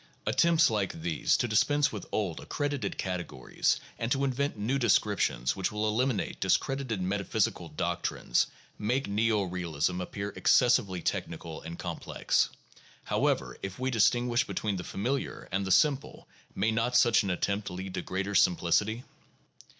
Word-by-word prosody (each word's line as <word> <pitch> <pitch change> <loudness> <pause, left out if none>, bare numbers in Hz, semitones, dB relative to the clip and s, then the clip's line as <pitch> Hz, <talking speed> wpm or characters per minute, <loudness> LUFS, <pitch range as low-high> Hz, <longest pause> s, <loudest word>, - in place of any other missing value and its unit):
Attempts 170 -4 +4
like 100 -6 -2
these 85 -3 +1
to - - 0
dispense 145 +7 +3
with 105 -4 -7
old 95 -7 -1
accredited 145 -2 -3
categories 90 -9 -1 0.2
and 115 +1 -2
to 140 0 +2
invent 140 -1 -1
new 120 +7 0
descriptions 100 - +2
which 95 - -1
will 105 0 -1
eliminate 115 -1 0
discredited 125 +3 0
meta 100 +2 -1
physical - - -1
doctrines, - - 0 0.3
make 125 +6 0
neo 105 0 +2
realism 90 -1 -2
appear 100 +3 -4
excessively 100 -7 +3
technical 80 -1 -3
and 85 +1 -7
complex. - - 0 0.5
However, - - 0
if 95 -1 -5
we 130 +1 -1
distinguish 120 +1 +3
between 105 -5 -2
the 90 - -5
familiar 125 +11 -3
and 100 0 -1
the - - -1
simple, 145 - +2 0.3
may 110 +4 +1
not 115 +2 +2
such 120 -2 +5
an 100 - -3
attempt 100 +3 -1
lead 95 +1 -6
to 90 - -2
greater 95 +3 -3
simplicity 100 +6 +2
105 Hz, 145 wpm, -29 LUFS, 95-125 Hz, 0.5 s, such